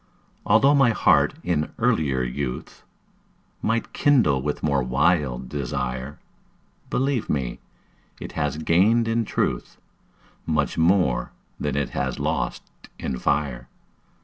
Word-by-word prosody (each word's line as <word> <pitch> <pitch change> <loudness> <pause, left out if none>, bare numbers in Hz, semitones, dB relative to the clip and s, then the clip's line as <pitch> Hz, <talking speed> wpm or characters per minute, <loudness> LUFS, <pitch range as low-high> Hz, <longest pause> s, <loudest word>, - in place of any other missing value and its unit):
Altho' 125 +7 +5
my 135 -4 +5
heart 115 - +3
in 75 -4 -1
earlier 65 -5 +1
youth 60 +1 -5 0.8
Might 115 +1 -1
kindle 120 - +3
with 75 +2 -3
more 70 -3 +2
wild 65 -1 +1
desire, 65 0 -4 0.7
Believe 135 -3 0
me, 60 -4 -2 0.6
it - - -7
has 75 +1 -2
gained 100 +9 +3
in 115 0 +1
truth - - -2 0.7
Much 75 -3 0
more 85 -5 +2 0.3
than - - -2
it 70 -3 -1
has 65 -1 -2
lost - - -2 0.3
in 65 -2 -4
fire. 70 -5 -1
75 Hz, 115 wpm, -24 LUFS, 65-100 Hz, 0.8 s, Altho